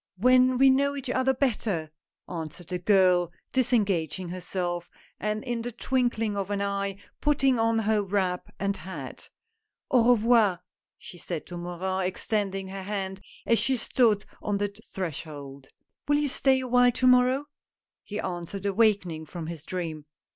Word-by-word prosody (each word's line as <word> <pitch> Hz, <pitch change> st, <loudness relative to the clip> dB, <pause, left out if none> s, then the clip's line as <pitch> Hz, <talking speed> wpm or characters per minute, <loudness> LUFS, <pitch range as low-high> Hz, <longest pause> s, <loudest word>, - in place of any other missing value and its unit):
" -, -, -52 dB
When 255 Hz, 0 st, +5 dB
we 270 Hz, +1 st, +7 dB
know 280 Hz, +2 st, +2 dB
each 270 Hz, -2 st, -4 dB
other 260 Hz, +1 st, +2 dB
better," 215 Hz, -, -1 dB, 0.4 s
answered 165 Hz, 0 st, -7 dB
the 180 Hz, -1 st, -2 dB
girl, 180 Hz, -2 st, +4 dB, 0.2 s
disengaging 195 Hz, -, +1 dB
herself, 175 Hz, -1 st, -3 dB, 0.3 s
and 215 Hz, 0 st, -2 dB
in 240 Hz, -2 st, -2 dB
the 245 Hz, +1 st, -4 dB
twinkling 240 Hz, -3 st, 0 dB
of 200 Hz, -1 st, -2 dB
an 205 Hz, -1 st, -1 dB
eye 200 Hz, -1 st, -2 dB, 0.2 s
putting 270 Hz, -4 st, +3 dB
on 225 Hz, 0 st, +2 dB
her 220 Hz, -1 st, +2 dB
wrap 190 Hz, -2 st, -1 dB
and 200 Hz, 0 st, -1 dB
hat. 185 Hz, +4 st, -8 dB, 0.3 s
" 435 Hz, -1 st, -37 dB
Au 245 Hz, -1 st, +5 dB
revoir! 220 Hz, -5 st, +3 dB, 0.2 s
" -, -, -67 dB
she 175 Hz, -, -12 dB
said 165 Hz, -3 st, -5 dB
to 175 Hz, -, -8 dB
Morin, 180 Hz, +2 st, -2 dB
extending 195 Hz, 0 st, -2 dB
her 195 Hz, 0 st, -6 dB
hand 190 Hz, -1 st, -4 dB, 0.2 s
as 230 Hz, -, +3 dB
she 265 Hz, -1 st, +1 dB
stood 220 Hz, -4 st, +2 dB, 0.2 s
on 205 Hz, -1 st, -1 dB
the 205 Hz, 0 st, -2 dB, 0.2 s
threshold. 145 Hz, -6 st, -6 dB, 0.4 s
"Will 290 Hz, 0 st, +4 dB
you 295 Hz, -1 st, +1 dB
stay 265 Hz, 0 st, +2 dB
a 255 Hz, -, -4 dB
while 245 Hz, 0 st, +5 dB
to 255 Hz, -, 0 dB
morrow?" 255 Hz, +2 st, +5 dB, 0.6 s
he 210 Hz, 0 st, -5 dB
answered, 185 Hz, +1 st, -5 dB
awakening 195 Hz, -6 st, +1 dB
from 170 Hz, 0 st, -6 dB
his 165 Hz, -2 st, -7 dB
dream. 165 Hz, -4 st, -4 dB
200 Hz, 160 wpm, -27 LUFS, 180-245 Hz, 0.6 s, we